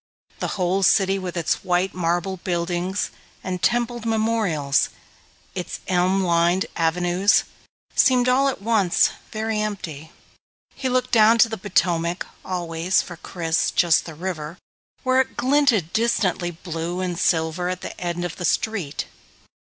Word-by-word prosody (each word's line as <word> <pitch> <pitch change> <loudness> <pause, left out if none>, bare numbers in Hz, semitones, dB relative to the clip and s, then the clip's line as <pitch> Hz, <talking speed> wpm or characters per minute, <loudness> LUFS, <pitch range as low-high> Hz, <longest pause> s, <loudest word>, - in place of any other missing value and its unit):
The - - -3
whole 185 +1 +1
city 195 +1 +3
with 185 -1 -5
its 165 - -1
white 180 +1 +1
marble 175 +2 -1
buildings 175 +2 -2 0.3
and 185 -1 -4
templed 240 -1 0
memorials, 220 -11 +1 0.6
its 180 -2 -5
elm 185 +1 +2
lined 175 +1 +2
avenues, 175 +4 +2 0.5
seemed 250 -2 +4
all 265 +2 +4
at 250 - -6
once 210 -6 +3 0.2
very 220 0 -1
empty. 165 -7 -5 0.6
He 265 -1 -3
looked 255 0 0
down 225 0 +6
to 230 0 +5
the 220 - -3
Potomac, 175 -3 0 0.2
always, 175 0 0
for 175 - -9
Chris, 165 -1 -1
just 170 -2 +3
"the 160 - -8
river," 170 -1 -5 0.5
where 260 0 +4
it 265 - -6
glinted 250 - +2
distantly 200 -6 +1
blue 170 +1 -5
and 180 -1 -2
silver 160 +2 +1
at 185 0 -4
the - - -7
end 175 0 -2
of 175 - -5
the 180 - -5
street. 180 -6 -1
185 Hz, 140 wpm, -23 LUFS, 170-215 Hz, 0.6 s, down